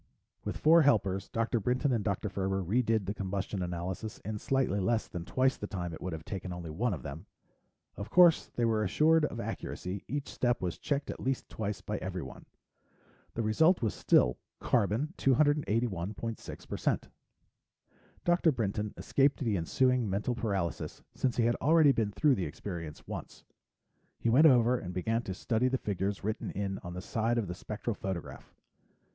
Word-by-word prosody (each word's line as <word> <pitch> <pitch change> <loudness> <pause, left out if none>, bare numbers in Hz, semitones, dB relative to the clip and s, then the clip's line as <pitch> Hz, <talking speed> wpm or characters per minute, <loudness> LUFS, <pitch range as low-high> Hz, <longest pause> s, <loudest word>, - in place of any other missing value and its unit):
With - - -3
four 165 +2 +6
helpers, 100 -9 +2
Dr. 115 +1 0
Brinton 125 +6 +1
and 115 -4 +1
Dr. 100 0 -1
Ferber 95 0 -1
redid 110 +2 +1
the 100 - -2
combustion 100 -1 -3
analysis 90 +4 -4
in 105 0 -3
slightly 130 -7 +1
less 110 +4 +1
than 90 -3 -6
twice 130 +5 +1
the 105 - -5
time 90 -4 -4
it - - -9
would 90 - -3
have 80 -1 -7
taken 95 -1 -5
only 85 -2 -6
one 100 +6 0
of 70 - -10
them. 80 +8 -7 0.7
Of 100 - -6
course 175 -2 +6
they 120 - +1
were 110 -2 +2
assured 155 - +4
of - - -5
accuracy; 95 +2 -5
each 145 +1 -3
step 120 -1 0
was 90 -2 -3
checked 145 -1 -1
at - - -8
least 130 0 -2
twice 105 -2 -4
by - - -3
everyone. - - -6 0.9
The 115 - -1
result 160 - +3
was 110 - +1
still 60 0 +3 0.2
carbon 120 - +1
281.6%. 115 - 0 1.2
Dr. 175 -1 +4
Brinton 105 -4 -2
escaped 140 +1 +2
the 115 -6 +1
ensuing 125 - +2
mental 100 +6 0
paralysis 100 -8 -3
since 130 -2 -1
he 120 - +3
had 120 0 +3
already 155 0 +5
been 110 -5 0
through 145 +6 +3
the 95 -8 -1
experience 80 0 -7
once. - - -7 0.7
He 115 - 0
went 150 +7 +7
over 125 -2 +4
and 90 -1 -7
began 115 +5 0
to 95 -5 -5
study 115 +5 +1
the 130 +1 +1
figures 100 -2 -2
written 110 +2 -2
in 95 -1 -3
on 90 0 -8
the 90 - -4
side 115 +1 0
of 110 -4 0
the 90 - -4
spectral 105 +5 -4
photograph. 95 -4 -6
110 Hz, 170 wpm, -31 LUFS, 95-125 Hz, 1.2 s, went